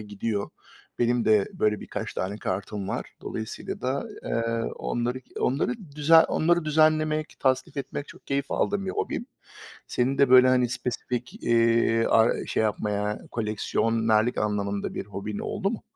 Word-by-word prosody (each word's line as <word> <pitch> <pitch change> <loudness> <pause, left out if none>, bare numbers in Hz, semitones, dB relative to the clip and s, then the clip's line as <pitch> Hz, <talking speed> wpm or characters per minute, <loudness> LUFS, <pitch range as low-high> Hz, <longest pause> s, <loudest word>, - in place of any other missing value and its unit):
gidiyor. 105 0 -3 0.5
Benim 120 0 +2
de 105 -3 +4
böyle 105 0 +1
birkaç - - -5
tane 100 +3 -3
kartım 100 +1 -3
var. - - -4
Dolayısıyla 110 0 -5
da, 130 +2 -1 0.2
eee, 115 0 -1
onları 120 +2 -2
k - - -11
onları 135 - +1 0.2
düze 150 +2 +6
onları 175 +1 +2
düzenlemek, 155 0 +2
tasnif 130 +1 +1
etmek 140 +1 -5
çok - - -14
keyif 140 0 -1
aldığım 200 -1 0
bir 190 - -1
hobim. 240 - -3 0.6
Senin 130 +3 0
de 140 -2 +4
böyle, 130 0 +8
hani, 125 -1 +3
spesifik, 125 0 -4
iii, 115 -1 +3
ar 115 +1 +3
şey - - 0
yapmaya, 105 0 -1
koleksiyonerlik 110 +1 +1
anlamında 100 -1 -1
bir - - -4
hobin 100 +1 -5
oldu 200 -1 -2
mu? 230 - -5
115 Hz, 145 wpm, -26 LUFS, 105-140 Hz, 0.6 s, böyle